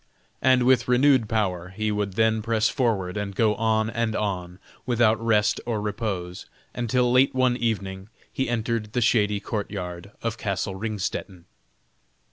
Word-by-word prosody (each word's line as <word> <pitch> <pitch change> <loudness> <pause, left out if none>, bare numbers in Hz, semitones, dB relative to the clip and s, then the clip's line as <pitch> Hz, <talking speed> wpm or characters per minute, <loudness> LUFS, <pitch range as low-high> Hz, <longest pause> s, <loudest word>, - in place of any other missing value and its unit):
And 130 -1 +4
with 125 -1 +3
renewed 125 -2 +4
power 90 -6 -1
he 105 +3 -2
would 105 -2 -2
then 110 0 +2
press 110 0 +1
forward, 105 -7 -1
and 100 -1 -4
go 110 0 +3
on 110 0 +1
and 115 -1 -1
on 90 -4 -3 0.3
without 115 -2 +2
rest 105 -2 +2
or 115 -3 -2
repose, 100 -4 -4 0.3
until 125 +1 +1
late 130 +1 +4
one 130 -1 +3
evening 100 -5 -3 0.2
he 130 -2 -1
entered 115 -2 -2
the 125 - +1
shady 105 -3 +2
court 105 0 -4
yard 90 -2 -6
of 115 0 -2
castle 100 -1 -2
Ringstetten. 95 -3 -4
110 Hz, 150 wpm, -25 LUFS, 100-115 Hz, 0.3 s, And